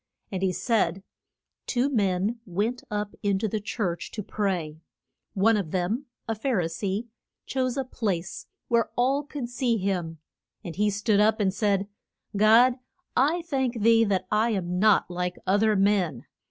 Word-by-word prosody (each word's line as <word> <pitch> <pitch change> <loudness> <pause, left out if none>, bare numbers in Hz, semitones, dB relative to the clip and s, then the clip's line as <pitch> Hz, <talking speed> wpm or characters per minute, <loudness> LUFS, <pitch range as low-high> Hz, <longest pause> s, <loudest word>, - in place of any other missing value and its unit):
And 190 -2 -3
he 190 -1 +2
said, 190 -1 0 0.6
Two 250 +1 +1
men 205 -3 0
went 210 +7 -2
up 210 -1 -3
in 200 -1 +1
to 220 - -1
the 215 +1 -2
church 195 -4 -3
to 210 - -4
pray. 175 -7 -2 0.5
One 220 +3 +4
of 195 -6 -2
them 195 - -1 0.2
a 225 - 0
Phar 225 0 0
i 175 - 0
see 195 +7 -3 0.4
chose 260 -1 -1
a 270 - 0
place 195 -8 -3 0.2
where 235 -1 +2
all 265 +4 +2
could 290 -3 -6
see 245 -1 0
him; 180 -5 -2 0.5
and 170 -3 -7
he 210 +1 +2
stood 205 +1 +1
up 220 +1 +3
and 195 -3 +1
said, 200 -1 +1 0.5
God 230 +5 +5 0.4
I 315 +7 +2
thank 265 -7 -1
thee 230 0 +6
that 195 -3 0
I 220 +2 +3
am 180 -4 -1
not 215 0 +4
like 180 0 -3
oth 200 +2 +2
er 220 -1 +3
men. 190 - +1
210 Hz, 165 wpm, -26 LUFS, 190-235 Hz, 0.6 s, thee